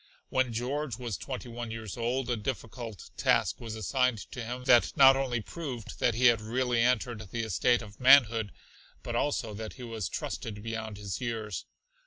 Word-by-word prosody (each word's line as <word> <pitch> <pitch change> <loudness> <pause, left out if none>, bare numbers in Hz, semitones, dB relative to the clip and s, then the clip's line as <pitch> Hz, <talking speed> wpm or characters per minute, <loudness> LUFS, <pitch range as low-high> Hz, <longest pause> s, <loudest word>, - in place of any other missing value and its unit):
When 130 -2 +1
George 125 +2 -2
was 120 -5 -4
twenty 130 -2 -6
one 120 0 -6
years 110 -3 -6
old 120 +2 -1
a 120 - +1
difficult 115 - -6
task - - +2
was 115 -2 -5
assigned 125 +3 +1
to 125 - -5
him 125 +2 -5
that 120 -2 +4
not 135 -1 +9
only 130 -4 -1
proved 130 -4 -7
that 120 -3 +2
he 125 +2 +2
had 115 -3 +6
really 120 +2 0
entered 120 -3 0
the 115 +2 -2
estate 115 +3 +2
of 105 -1 -13
manhood, 120 -5 +6 0.5
but 120 - -4
also 120 -4 0
that 110 +1 -6
he 125 - -10
was 115 -5 -4
trusted 105 -2 -5
beyond 110 -2 -4
his 100 0 -5
years. 110 -5 -4
120 Hz, 180 wpm, -30 LUFS, 110-125 Hz, 0.5 s, not